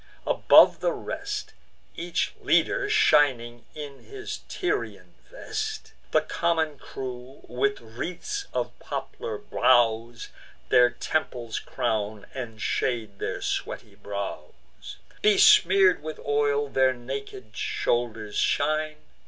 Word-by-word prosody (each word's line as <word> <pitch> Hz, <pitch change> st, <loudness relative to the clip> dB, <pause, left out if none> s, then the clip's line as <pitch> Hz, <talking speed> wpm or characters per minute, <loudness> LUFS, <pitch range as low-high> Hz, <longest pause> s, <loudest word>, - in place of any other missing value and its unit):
Above -, -, +6 dB
the -, -, 0 dB
rest, 415 Hz, +1 st, -5 dB, 0.4 s
Each 175 Hz, +1 st, -2 dB
leader 405 Hz, -, +2 dB
shining 135 Hz, -, +3 dB
in 145 Hz, -2 st, -8 dB
his 410 Hz, 0 st, -7 dB
Tyrian 405 Hz, +3 st, -3 dB, 0.2 s
vest; 435 Hz, -3 st, -5 dB, 0.2 s
The -, -, +3 dB
common 160 Hz, -4 st, -1 dB
crew 130 Hz, 0 st, -8 dB
with 140 Hz, +3 st, 0 dB
wreaths 175 Hz, -, -5 dB
of -, -, -2 dB
poplar 470 Hz, -2 st, -5 dB
boughs 120 Hz, -, +2 dB, 0.4 s
Their 125 Hz, 0 st, +6 dB
temples 120 Hz, -5 st, -3 dB
crown, 110 Hz, -4 st, -2 dB
and 120 Hz, -5 st, -6 dB
shade 110 Hz, -3 st, -2 dB
their -, -, -3 dB
sweaty -, -, -3 dB
brows: 100 Hz, -1 st, -8 dB, 0.2 s
Besmear'd 415 Hz, -1 st, +6 dB
with 155 Hz, 0 st, -6 dB
oil, 145 Hz, 0 st, +1 dB
their 130 Hz, -1 st, +3 dB
naked 125 Hz, -3 st, -7 dB
shoulders 110 Hz, -3 st, -1 dB
shine. 155 Hz, +1 st, +1 dB
140 Hz, 105 wpm, -26 LUFS, 120-185 Hz, 0.4 s, Above